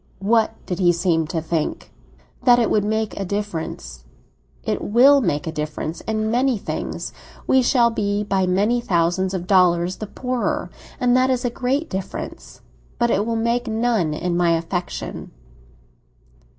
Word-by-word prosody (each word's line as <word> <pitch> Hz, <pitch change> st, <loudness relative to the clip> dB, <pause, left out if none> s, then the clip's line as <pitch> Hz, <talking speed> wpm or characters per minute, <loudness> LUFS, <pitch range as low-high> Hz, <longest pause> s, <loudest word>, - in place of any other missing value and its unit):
"What 220 Hz, +3 st, +2 dB
did 180 Hz, -2 st, -4 dB
he 175 Hz, -2 st, +5 dB
seem 170 Hz, -2 st, +1 dB
to 160 Hz, 0 st, -3 dB
think?" 160 Hz, -2 st, -3 dB, 0.5 s
"That 245 Hz, -1 st, +6 dB
it 235 Hz, -, +1 dB
would 210 Hz, -, +3 dB
make 220 Hz, 0 st, -1 dB
a -, -, -1 dB
difference." 165 Hz, -, -5 dB, 0.6 s
"It -, -, -2 dB
will 270 Hz, +6 st, +5 dB
make 170 Hz, -, -1 dB
a 160 Hz, -, -3 dB
difference—in 160 Hz, +8 st, -3 dB
many 250 Hz, +1 st, +2 dB
things. -, -, -5 dB, 0.3 s
We 265 Hz, -, +4 dB
shall 240 Hz, -2 st, +3 dB
be 205 Hz, -2 st, -1 dB
by 195 Hz, -2 st, 0 dB
many 205 Hz, +7 st, +2 dB
thousands 185 Hz, -1 st, +1 dB
of 180 Hz, -1 st, -4 dB
dollars 180 Hz, -1 st, +3 dB
the 215 Hz, -, -6 dB
poorer; 250 Hz, +3 st, -2 dB, 0.3 s
and 250 Hz, -1 st, +3 dB
that 255 Hz, +1 st, +3 dB
is 255 Hz, -1 st, 0 dB
a 245 Hz, -, 0 dB
great 265 Hz, +6 st, -1 dB
difference. 190 Hz, 0 st, -6 dB, 0.4 s
But 235 Hz, -1 st, +2 dB
it 205 Hz, +3 st, +1 dB
will 230 Hz, -, 0 dB
make 235 Hz, +2 st, 0 dB
none 220 Hz, -8 st, 0 dB
in 175 Hz, +2 st, -2 dB
my 175 Hz, -1 st, +3 dB
affection." 175 Hz, +2 st, -5 dB
205 Hz, 155 wpm, -21 LUFS, 175-235 Hz, 0.6 s, That